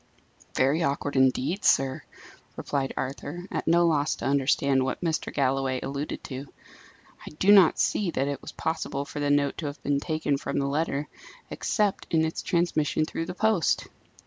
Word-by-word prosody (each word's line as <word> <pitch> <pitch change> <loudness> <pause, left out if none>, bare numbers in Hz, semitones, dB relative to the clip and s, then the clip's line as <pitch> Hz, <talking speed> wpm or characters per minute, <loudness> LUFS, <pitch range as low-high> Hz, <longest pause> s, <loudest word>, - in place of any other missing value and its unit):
"Very 140 +6 +2
awkward, 140 -1 -1
indeed, 130 +8 +2
sir," 135 -1 +3 0.5
replied 135 -2 -2
Arthur, 145 +6 -5
at - - -3
no 170 +1 +4
loss 155 -3 +1
to - - -7
understand 140 0 +2
what 130 - -3
Mr. 160 -2 -1
Galloway 135 -1 0
alluded 140 +3 -5
to. 135 0 -7 0.7
"I - - -8
do 195 +5 +4
not 195 -5 +7
see 200 -4 +1
that 140 -4 -1
it 140 -2 -3
was - - -8
possible 150 -3 -3
for 145 - -7
the 145 0 0
note 145 -1 +1
to 155 - -3
have 145 - -6
been 140 0 +1
taken 155 -2 -1
from - - -4
the 140 - +1
letter, 145 0 -1 0.4
except 210 -4 -1
in 160 -1 +3
its 160 - -3
transmission 155 -3 +1
through 165 +1 -4
the 180 - -5
post." 220 -4 +1
145 Hz, 175 wpm, -26 LUFS, 140-165 Hz, 0.7 s, not